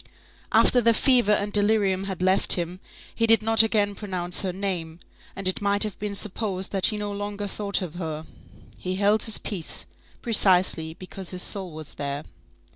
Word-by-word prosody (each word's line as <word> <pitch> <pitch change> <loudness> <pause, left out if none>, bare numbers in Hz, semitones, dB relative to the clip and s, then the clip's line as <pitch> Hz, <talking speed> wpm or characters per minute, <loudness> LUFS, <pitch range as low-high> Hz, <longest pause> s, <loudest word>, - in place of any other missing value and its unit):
After 250 - +4
the 230 0 +3
fever 245 -6 +3
and 205 0 -1
delirium 205 -2 +1
had 190 -2 -4
left 185 +1 +4
him, 175 +1 -2 0.3
he 230 - 0
did 225 -1 +5
not 225 0 +6
again 210 -2 +2
pronounce 185 -4 -1
her 190 - -2
name, 175 -4 -4 0.4
and 195 -1 -3
it 185 - +1
might 205 +1 +2
have 215 -3 -4
been 205 -1 -4
supposed 195 -2 -2
that 195 -2 +3
he 215 - -1
no 205 0 -4
longer 205 0 -5
thought 200 -1 -2
of 170 -4 -7
her. 160 -3 -5 0.5
He 185 0 -3
held 205 +2 +2
his 220 - +1
peace, 180 -7 -4 0.4
precisely 180 -7 +3
because 185 0 -8
his 180 -1 -2
soul 195 -3 -2
was 155 -1 -9
there. 140 0 -4
195 Hz, 180 wpm, -25 LUFS, 180-210 Hz, 0.5 s, not